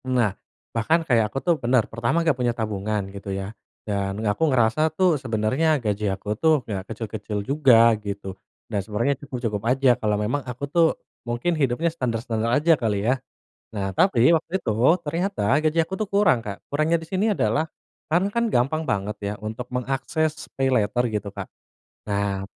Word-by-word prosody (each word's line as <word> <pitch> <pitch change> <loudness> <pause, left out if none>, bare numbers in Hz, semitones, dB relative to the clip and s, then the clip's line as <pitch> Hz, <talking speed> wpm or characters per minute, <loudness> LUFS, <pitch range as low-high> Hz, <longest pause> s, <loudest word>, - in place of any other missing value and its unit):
Nah, 125 -6 +1 0.4
bahkan 160 +9 +1
kayak 115 -7 +2
aku - - -7
tuh 175 -2 +4
benar, 120 -1 +3
pertama 115 +9 -1
nggak 160 - +4
punya 125 -2 0
tabungan, 105 -2 -2
gitu 100 0 -8
ya, 95 +2 -4 0.3
dan 100 -1 -2
aku 110 +10 +1
ngerasa 130 +5 +3
tuh 175 -7 +3
sebenarnya 130 +6 +1
gaji 105 -4 -1
aku 95 +2 -3
tuh 155 -4 +3
nggak 100 -3 -5
kecil-kecil 110 -1 -5
juga, 125 -5 +5
gitu. 100 -2 -5 0.3
Dan, 105 -3 -2
sebenarnya, 110 +7 0
cukup-cukup 120 -8 -3
aja 130 0 +4
kalau 105 -1 +1
memang 110 +8 -1
aku 125 +2 -7
tuh 165 +3 +3 0.3
mungkin 120 +8 -1
hidupnya 155 +2 0
standar-standar 115 -5 -2
aja, 150 +6 +4
kali 105 -3 0
ya? 125 +2 +1 0.6
Nah, 95 -1 -2
tapi, 130 - +4
waktu 165 0 0
itu 110 - 0 0.3
ternyata 175 - -2 0.2
gaji 155 +1 0
aku 175 +4 -6
tuh 215 - -1
kurang, 200 - +3
Kak. 105 -3 -8
Kurangnya 155 +3 +2
di - - -6
sini 200 +6 0
adalah 115 +9 +1 0.4
sekarang 180 +5 +2
kan 235 +1 +1
gampang 150 - +1
banget 105 +1 -1
ya, 100 0 -3
untuk 110 +3 -5
mengakses 135 +5 -2
paylater, 125 -3 +1
gitu, 105 -1 -2
Kak. 100 - -6 0.7
Nah, 100 -1 -1
120 Hz, 170 wpm, -24 LUFS, 105-155 Hz, 0.7 s, juga